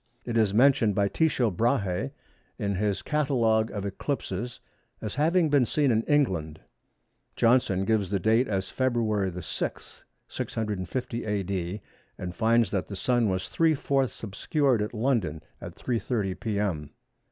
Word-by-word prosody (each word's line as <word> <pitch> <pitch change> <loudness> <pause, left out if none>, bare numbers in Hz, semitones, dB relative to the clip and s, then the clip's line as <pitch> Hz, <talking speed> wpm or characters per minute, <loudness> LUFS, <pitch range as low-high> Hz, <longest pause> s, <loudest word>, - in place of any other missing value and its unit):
It 120 - -3
is 110 -3 +3
mentioned 115 -2 +4
by 100 -1 +2
Tycho 130 -7 +1
Brahe 115 +2 0 0.5
in 100 -4 -1
his 100 +1 -1
catalogue 120 -7 +2
of 100 -1 -4
eclipses 110 +1 -4 0.4
as 110 - -5
having 165 +4 +3
been 135 -5 +4
seen 145 -4 +2
in 110 -1 +3
England. 90 - +1 0.8
Johnson 115 -6 +3
gives 105 -3 +1
the 100 - +1
date 110 +6 +3
as 95 -2 -2
February 110 -7 0
6, 90 -2 -5 0.2
650 110 +3 -3
A.D., 100 -2 -2 0.4
and 90 -1 -5
finds 115 -2 +3
that 95 -3 -1
the 100 - -6
Sun 120 +1 +1
was 95 0 -2
three 165 -1 +2
fourths 135 -3 -1
obscured 125 +4 +1
at 105 +3 -3
London 110 - 0 0.2
at - - -8
3.30 115 -5 -2
p.m. 100 -9 -2
110 Hz, 140 wpm, -27 LUFS, 95-125 Hz, 0.8 s, mentioned